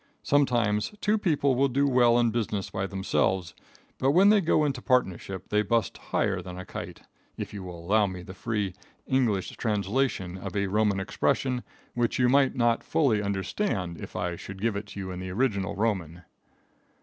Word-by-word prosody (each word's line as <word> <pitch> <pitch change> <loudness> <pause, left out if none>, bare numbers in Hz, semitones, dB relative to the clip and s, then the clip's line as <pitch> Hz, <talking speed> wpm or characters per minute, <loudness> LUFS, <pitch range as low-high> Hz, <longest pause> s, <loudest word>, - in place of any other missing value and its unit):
Sometimes 120 - +2
two 210 +1 +1
people 140 -7 +2
do 140 +2 +1
well 120 -3 +4
in 120 -1 +3
business 105 -4 -2
by 95 0 -2
themselves, 95 -2 0 0.5
but 135 +2 +3
when 190 +4 +6
they 210 -1 +5
go 155 -3 +3
into 135 -3 -2
partnership 95 -7 0
they 105 - +3
bust 110 +1 0
higher - - -1
than 90 -1 -8
a 90 - -7
kite, - - -8 0.3
if - - -5
you 100 - -6
will 85 -2 -8
allow 105 +2 +3
me 90 -2 -6
the 95 - -9
free, 105 -2 -2 0.3
English 120 -8 +1
translation 100 -3 -1
of 90 - -6
a 100 0 +1
Roman 100 0 +1
expression 125 +5 0 0.3
which 120 -1 0
you 125 -1 +3
might 135 0 +4
not 120 -2 +2
fully 125 -10 +2
understand 95 - -2
if - - -9
I 90 -1 -2
should 95 +3 -9
give 110 +1 0
it 100 +1 -4
to 100 - -8
you 95 -1 -5
in 90 - -6
the 95 0 -5
original 100 -2 0
Roman. 95 -6 -2
105 Hz, 180 wpm, -27 LUFS, 95-125 Hz, 0.5 s, when